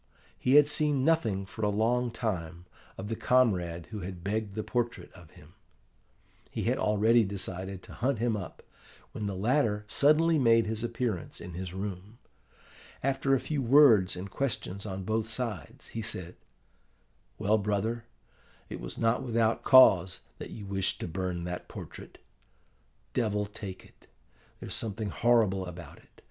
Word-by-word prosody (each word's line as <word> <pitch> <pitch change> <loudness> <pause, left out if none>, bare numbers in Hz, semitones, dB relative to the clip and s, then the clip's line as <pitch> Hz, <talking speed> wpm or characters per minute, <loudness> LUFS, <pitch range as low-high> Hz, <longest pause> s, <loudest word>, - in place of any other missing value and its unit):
He 130 +2 +2
had 150 -1 +8
seen 150 -3 +2
nothing 115 -13 +1
for 105 - -9
a 105 - +3
long 120 +4 +1
time 90 -7 -4 0.3
of 95 - -6
the 115 - -2
comrade 90 -11 +1
who 105 - -5
had 90 -2 -7
begged 105 0 -2
the 110 - -2
portrait 120 0 -3
of 90 -4 -15
him. 75 +3 -17 1.0
He - - -4
had - - 0
already 110 +3 +4
decided 95 -1 -4
to - - -12
hunt 130 +1 0
him 115 0 0
up, 95 -4 -7 0.5
when 105 - -4
the 100 - -3
latter 105 0 +1
suddenly 155 +6 +4
made 115 -3 +4
his 110 +1 -3
appearance 115 -6 -3
in 90 0 -8
his 90 +1 -6
room. 100 +2 -6 0.9
After 135 0 +2
a - - +1
few 150 0 -2
words 115 -8 +6
and 95 +2 -7
questions 105 -6 -3
on 95 -1 -5
both 110 +3 -1
sides, 105 - -5
he 115 - -5
said, 90 -5 -4 1.0
'Well, 110 +1 +2
brother, 105 +3 -1 0.6
it - - -6
was - - -7
not 115 +1 +1
without 115 -2 +1
cause 95 -8 +6 0.2
that - - -7
you 105 - -8
wished 95 -1 -1
to - - -3
burn 90 0 -3
that 90 0 -5
portrait. - - -10 1.0
Devil 105 -3 0
take 100 -2 -8
it, - - -23 0.5
there's - - -6
something 110 -1 -3
horrible 105 -6 +2
about 90 -1 -10
it! - - -24
105 Hz, 155 wpm, -29 LUFS, 95-120 Hz, 1.0 s, had